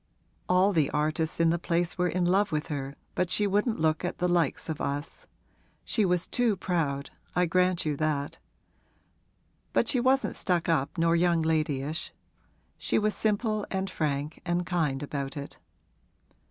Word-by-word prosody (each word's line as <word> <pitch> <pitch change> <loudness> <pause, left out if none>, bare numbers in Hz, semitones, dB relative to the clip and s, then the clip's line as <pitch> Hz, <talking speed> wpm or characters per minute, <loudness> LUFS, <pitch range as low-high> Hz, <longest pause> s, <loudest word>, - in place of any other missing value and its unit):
All 185 +3 +4
the 155 -5 +2
artists 155 +3 -1
in 165 -1 +4
the 170 - 0
place 170 0 0
were 180 -1 +1
in 180 0 0
love 195 +4 +3
with 150 -1 -2
her 140 -2 -4 0.2
but 180 - 0
she 210 - +1
wouldn't 205 +2 +1
look 155 +1 +1
at 175 - -2
'the 180 - +1
likes' 170 -5 +1
of 160 -2 -4
us. 145 +2 -4 0.6
She 215 - +1
was 180 -1 +1
too 240 -4 +1
proud 150 -7 -1 0.2
I 180 +1 +3
grant 180 0 +2
you 150 -1 0
that; 150 -2 -1 1.3
but - - +3
she 255 - +1
wasn't 260 +2 +2
stuck 175 -3 0
up 155 -1 0
nor 165 0 +3
young 170 -1 +3
ladyish; 155 -1 -1 0.7
she - - +1
was 215 0 +2
simple 215 +1 0
and 190 0 -2
frank 150 0 -2
and 175 0 0
kind 155 -6 0
about 140 0 -4
it. 140 - -7
170 Hz, 165 wpm, -28 LUFS, 150-185 Hz, 1.3 s, All